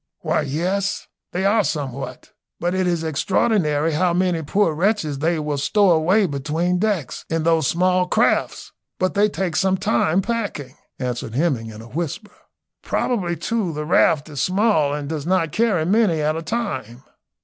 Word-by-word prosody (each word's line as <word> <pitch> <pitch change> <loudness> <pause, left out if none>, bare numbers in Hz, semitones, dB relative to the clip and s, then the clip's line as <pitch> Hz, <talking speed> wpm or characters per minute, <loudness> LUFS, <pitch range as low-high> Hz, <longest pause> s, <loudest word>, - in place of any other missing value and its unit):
"Why, - - 0
yes, 180 +8 -1 0.3
they 190 +2 -1
are 210 +2 +3
somewhat; 140 -5 -4 0.3
but 175 +1 -1
it 185 -1 0
is 170 -2 0
extraordinary 160 -1 +1
how 170 +3 +1
many 180 -2 +1
poor 165 +3 +1
wretches 165 -4 0
they 165 +3 +1
will 150 -2 -2
stow 200 +6 +3
away 180 +6 +3
between 160 +4 -1
decks 200 -8 -1
in 165 -1 -1
those 160 -3 +2
small 180 +1 +2
crafts; - - +1 0.3
but 185 0 0
they 210 +1 +3
take 185 -5 -3
some 190 +2 +2
time 160 +7 +1
packing," 200 - -3 0.2
answered 125 -2 -4
Hemming, 135 -7 0
in 110 0 -10
a - - -12
whisper. 170 - -5 0.5
"Probably 185 -8 -1
too 210 -3 -2
the 150 0 -4
raft 155 -1 +3
is 145 -4 -4
small 185 -6 +2
and 145 0 -3
does 155 0 -4
not 175 -4 +1
carry 210 -6 +1
many 195 -3 +2
at 155 +1 0
a 165 - -3
time." 135 - -4
165 Hz, 165 wpm, -21 LUFS, 150-190 Hz, 0.5 s, are